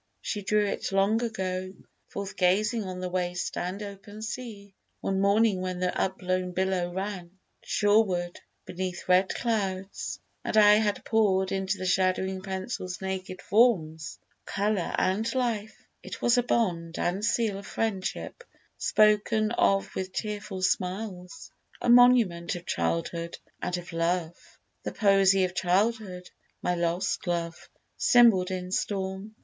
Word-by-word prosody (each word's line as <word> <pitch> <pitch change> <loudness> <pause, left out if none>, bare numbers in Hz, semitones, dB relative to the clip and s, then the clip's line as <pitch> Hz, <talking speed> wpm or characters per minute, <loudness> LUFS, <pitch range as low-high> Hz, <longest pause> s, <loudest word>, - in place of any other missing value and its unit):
She 210 - -4
drew 210 +1 +2
it 200 - -3
long 200 +4 +2
ago 185 -4 -3 0.3
Forth 200 0 -6
gazing 210 +4 +2
on 185 -1 -6
the 180 - -3
waste 180 -1 -2
and 185 +4 -3
open 205 +1 -9
sea, 220 -4 -7 0.3
One 195 0 -1
morning 200 0 +3
when 185 -1 -3
the 180 0 -1
upblown 185 -1 -1
billow 185 -1 0
ran 190 -1 -5 0.2
Shoreward 205 -5 +1 0.3
beneath 180 0 -5
red 185 +1 +4
clouds, 195 -5 -2 0.2
and - - -1
I 210 0 +8
had 210 -2 -1
pour'd 195 -4 +2
Into 195 +1 -1
the 185 - -5
shadowing 185 0 +1
pencil's 190 -1 -5
naked 190 -1 -5
forms 175 -8 +2 0.3
Colour 200 -3 -1
and 200 +5 +1
life: 230 -4 -1 0.2
it - - -8
was 240 +1 +3
a 245 - +4
bond 175 -9 -1
and 185 +4 -1
seal 220 -3 +1
Of 200 - -11
friendship, 205 -4 -3 0.4
spoken 215 +1 +3
of 195 -4 +2
with 185 0 -4
tearful 205 -3 -4
smiles; 185 - -2 0.3
A - - -1
monument 240 -10 +5
of 175 0 -8
childhood 85 - -2 0.2
and 180 - -2
of 175 0 -9
love, 165 0 0 0.5
The - - -5
poesy 195 -2 +4
of 180 - -5
childhood; 185 0 0 0.4
my 180 - +1
lost 175 +1 -1
love 170 -1 -3 0.3
Symbol'd 225 -7 +5
in 185 -1 -4
storm. 195 +2 -3
190 Hz, 135 wpm, -27 LUFS, 180-210 Hz, 0.5 s, I